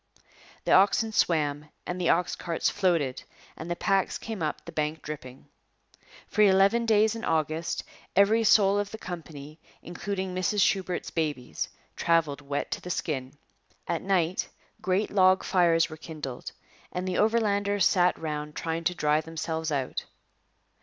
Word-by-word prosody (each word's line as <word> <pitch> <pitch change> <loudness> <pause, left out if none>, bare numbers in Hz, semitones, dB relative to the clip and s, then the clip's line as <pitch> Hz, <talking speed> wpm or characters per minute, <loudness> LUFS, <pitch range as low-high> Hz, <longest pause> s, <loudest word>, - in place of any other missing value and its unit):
The - - 0
oxen 205 +3 +4
swam 150 -6 +1 0.2
and 180 +1 -4
the 175 - +2
ox 175 +1 +2
carts 170 -2 -1
floated 170 -10 +1 0.3
and 160 - -8
the 175 - -1
packs 195 +1 +1
came 220 -5 -6
up 155 -1 -3
the 170 - -8
bank 155 0 -2
dripping. 135 -4 -8 0.8
For 215 - 0
eleven 200 +4 +4
days 220 0 +4
in 230 0 -7
August 160 +1 -1 0.3
every 215 +4 +5
soul 205 -2 +5
of 205 0 -2
the 220 - -7
company, 160 -5 -8 0.2
including 190 +1 -4
Mrs 185 +3 0
Shubert's 185 -2 0
babies, 150 -6 -2 0.3
travelled 165 -4 +1
wet 140 0 -3
to - - -3
the 180 - -8
skin. 135 -6 -3 0.5
At 170 -1 -1
night 185 -2 0 0.3
great 190 +3 0
log 185 -1 +4
fires 170 -3 +3
were 155 - -9
kindled 150 -5 -7 0.4
and 180 +1 -3
the 185 - -1
Overlanders 205 -3 +2
sat 180 0 +3
round 150 -1 -4
trying 165 0 -3
to 180 - +1
dry 150 -1 +2
themselves 160 0 -4
out. 135 -3 -2
175 Hz, 150 wpm, -27 LUFS, 155-195 Hz, 0.8 s, every